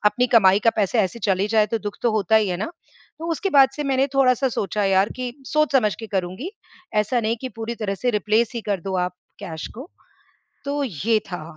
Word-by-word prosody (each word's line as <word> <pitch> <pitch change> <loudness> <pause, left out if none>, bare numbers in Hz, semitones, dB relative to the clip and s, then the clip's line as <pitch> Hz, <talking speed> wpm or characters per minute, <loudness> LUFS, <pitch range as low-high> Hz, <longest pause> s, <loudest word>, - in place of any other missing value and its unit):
अपनी 245 +5 +3
कमाई 195 -3 +6
का - - +8
पैसे 210 +2 +1
ऐसे 195 +3 -1
चले 195 -1 +1
जाए, 215 -1 +3
तो 225 +2 -2
दुख 205 -1 -6
तो 240 - +3
होता 215 0 +3
ही 215 -2 +3
है 180 - -1
ना। 215 - -3 0.5
तो 330 +1 -4
उसके 390 +5 -2
बाद 275 -4 +6
से 295 - -3
मैंने 270 0 +2
थोड़ा-सा 265 0 +3
सोचा 210 -3 -2
यार 195 +1 +3
कि 250 -1 -4
सोच 305 +1 +1
समझ 215 -7 +3
के 225 - -6
करूँगी। 190 - -3 0.5
ऐसा 225 +4 +1
नहीं 225 +1 0
कि 260 - -3
पूरी 225 +1 -3
तरह 205 -3 -2
से 245 +5 -1
रिप्लेस 215 +2 +1
ही 235 - -2
कर 195 -3 0
दो 190 +1 -3
आप 180 - -8 0.3
कैश 160 -2 -6
को। 265 +9 -9 0.8
तो 285 +1 -1
ये 220 - 0
था। 180 -4 -5
220 Hz, 225 wpm, -22 LUFS, 195-255 Hz, 0.8 s, का